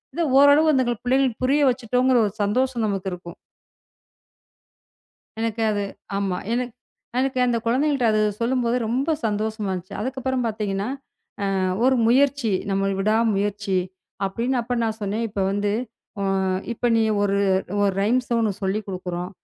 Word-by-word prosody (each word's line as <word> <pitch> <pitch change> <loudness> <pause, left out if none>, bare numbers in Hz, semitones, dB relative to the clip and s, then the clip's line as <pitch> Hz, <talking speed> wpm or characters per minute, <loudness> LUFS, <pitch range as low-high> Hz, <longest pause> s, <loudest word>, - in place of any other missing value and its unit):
இது 340 - 0 0.2
ஓரளவு 285 +3 +6
அந்தப் 260 -3 +2
பிள்ளைகள்க்கு 255 -2 +1
புரிய 285 +2 +3
வெச்சிட்டோம்ங்கிற 250 +1 +2
ஒரு 200 - -6
சந்தோஷம் 245 +2 0
நமக்கு 195 -1 -2
இருக்கும். 175 -1 -9 2.0
எனக்கு 225 0 -2
அது 205 -1 -1 0.3
ஆமா. 195 -2 -1 0.2
எனக் 245 -1 -2 0.5
எனக்கு 265 0 0
அந்தக் 235 -2 -1
குழந்தைகள்ட்ட 265 +1 +2
அது 215 - +2 0.2
சொல்லும்போது 240 0 +1
ரொம்ப 265 +7 0
சந்தோசமா 215 -1 -2
இருந்துச்சு. 185 -1 -5
அதுக்கப்புறம் 260 +1 -2
பாத்தீங்கன்னா, 205 -1 -2 0.7
அ - - +1 0.3
ஒரு 260 +1 +5
முயற்சி, 265 -1 +3 0.2
நம்மளோட 195 0 +1
விடாமுயற்சி 205 -2 +1 0.5
அப்படின்னு 235 +7 -1
அப்ப 240 +1 -3
நான் 220 -1 -1
சொன்னேன். 210 +3 -1
இப்ப 205 -1 -4
வந்து 205 +1 0 0.5
அ - - -1 0.5
இப்ப 235 - -2
நீ 225 - +3 0.2
ஒரு 200 -1 +1 0.5
ஒரு 200 -1 +3
ரைம்ஸ 245 +4 +1
உனக்குச் 205 -3 -1
சொல்லிக் 200 +2 -1
கொடுக்கிறோம். 180 -1 -4
225 Hz, 135 wpm, -23 LUFS, 200-255 Hz, 2.0 s, ஓரளவு